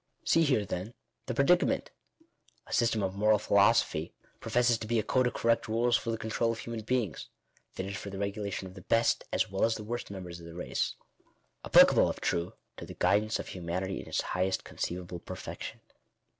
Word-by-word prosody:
See 165 - +4
here 130 -10 +2
then 95 +6 -5 0.3
the 125 - -2
predicament. 175 +7 +3 0.7
A - - -8
system 115 -3 +2
of 95 -1 -1
moral 105 +2 +4
philo 100 +1 +5
sophy 80 -8 -1 0.2
professes 120 -1 +2
to 110 - -6
be 120 +1 +1
a 110 - +2
code 130 +3 +2
of 120 - -4
correct 115 0 +1
rules 120 +2 +2
for 115 - -1
the 115 - -1
control 115 +1 0
of 115 - -4
human 115 -1 -5
beings 110 -5 -2 0.2
— - - -37
fitted 95 +1 -4
for 100 +1 -6
the 100 - -7
regulation 100 -1 -3
of 95 - -9
the 95 - -11
best, 115 +5 +2
as - - 0
well 95 - 0
as 115 0 +3
the 105 - -6
worst 120 +3 -4
members 90 -3 -7
of 85 - -11
the 85 - -10
race 90 - -2 0.3
— - - -41
applicable, - - +6
if - - -4
true, 85 +1 -1 0.2
to - - -7
the - - -9
guid 105 - +3
ance 110 +1 -2
of - - -6
humanity 90 +2 -3
in - - -13
its - - 0
highest 95 +1 -1
conceivable 90 0 -5
perfection. - - -7
105 Hz, 210 wpm, -30 LUFS, 95-115 Hz, 0.7 s, applicable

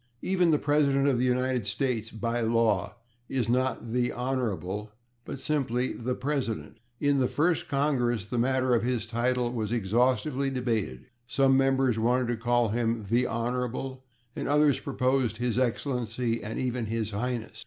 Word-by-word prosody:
Even 180 -2 +2
the 155 - +4
President 140 -2 +2
of 130 -4 +2
the 125 - +2
United 125 -3 0
States, 115 -1 -1
by 115 +2 -2
law, 115 -4 +1 0.3
is 125 -4 -1
not 125 0 0
/the 125 0 +1
Honorable/, 105 -6 -2 0.3
but 140 - -6
simply 130 -4 0
/the 125 +2 -3
President/. 130 -5 -3 0.2
In 145 -1 +2
the 130 - +3
First 165 +4 +1
Congress 125 -7 +1
the 120 +3 -2
matter 130 +1 +2
of 120 - +3
his 120 -2 -1
title 120 +1 0
was 110 -3 -3
exhaustively 125 +6 +1
debated; 115 - -2 0.2
some 135 +3 +3
members 135 -3 +2
wanted 120 +2 +2
to 120 - +1
call 120 0 +2
him 115 0 -1
/the 120 +5 +1
Honorable/ 125 +3 -3 0.3
and - - -3
others 145 -1 +3
proposed 130 -4 0
/His 120 0 0
Excellency/ 120 -2 -1
and 110 +2 -5
even 125 -3 -2
/His 110 -1 -2
Highness 115 +2 -3
125 Hz, 155 wpm, -28 LUFS, 115-130 Hz, 0.3 s, the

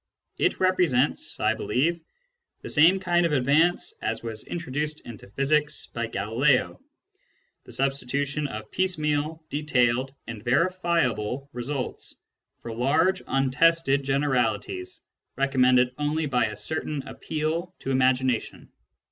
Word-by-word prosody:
It - - +1
represents, 175 -8 +1
I - - +2
believe, 165 +7 0 0.6
the - - -6
same 170 +6 +5
kind 175 -2 +2
of 165 -3 +1
advance 155 - +2
as - - -2
was 110 -2 -6
introduced 150 -2 -3
into 110 -4 -11
physics 150 +6 0
by 115 0 -2
Galileo: 125 - +1 0.8
the - - -12
substitution 140 +2 -1
of 110 -4 -8
piecemeal, 155 -4 -1
detailed, 130 -3 +1
and 110 -2 -8
verifiable 140 - 0
results 125 +2 -5 0.4
for 115 - -5
large 155 +11 +2
untested 135 +2 +3
generalities 145 - -1 0.3
recommended 130 -2 +3
only 150 +2 0
by 125 -5 +1
a 105 -1 -7
certain 150 -1 -3
appeal 160 +3 -3
to 135 - -3
imagination. 130 -2 0
140 Hz, 115 wpm, -26 LUFS, 125-160 Hz, 0.8 s, same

